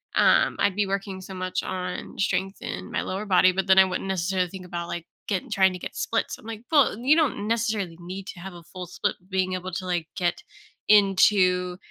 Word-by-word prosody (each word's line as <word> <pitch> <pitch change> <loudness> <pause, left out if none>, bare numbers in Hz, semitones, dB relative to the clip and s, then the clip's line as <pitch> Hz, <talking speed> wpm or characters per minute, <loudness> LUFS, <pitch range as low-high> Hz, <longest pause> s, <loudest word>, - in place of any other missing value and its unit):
um, - - +4
I'd 200 -2 +2
be 205 -1 +1
working 195 -1 -3
so 190 0 -9
much 185 0 -2
on 180 -1 -5
strength 195 0 0
in 90 +1 -6
my - - -1
lower 195 +3 -4
body, 185 -1 +5
but 190 +1 -2
then 190 0 +5
I 190 - +9
wouldn't 185 +1 -3
necessarily 185 -1 0
think 185 -1 -9
about, 175 -1 -5
like, 170 -1 -5 0.2
getting 195 -4 -2
trying 190 -1 +4
to 180 - -7
get - - -7
splits. 225 - -1
I'm, - - -17
like, 225 -1 -6
"Well, 285 -8 +4
you 265 +6 +4
don't 280 -10 +1
necessarily 215 -7 -1
need 185 +2 -7
to 175 - -8
have 190 +1 -8
a 170 -1 -12
full 180 +1 -8
split, 205 - -2
being 185 -1 0
able 185 0 -4
to, 185 +1 -4
like, 175 -3 -1
get 175 -1 0 0.5
into 185 -3 +4
190 Hz, 215 wpm, -25 LUFS, 180-200 Hz, 0.5 s, I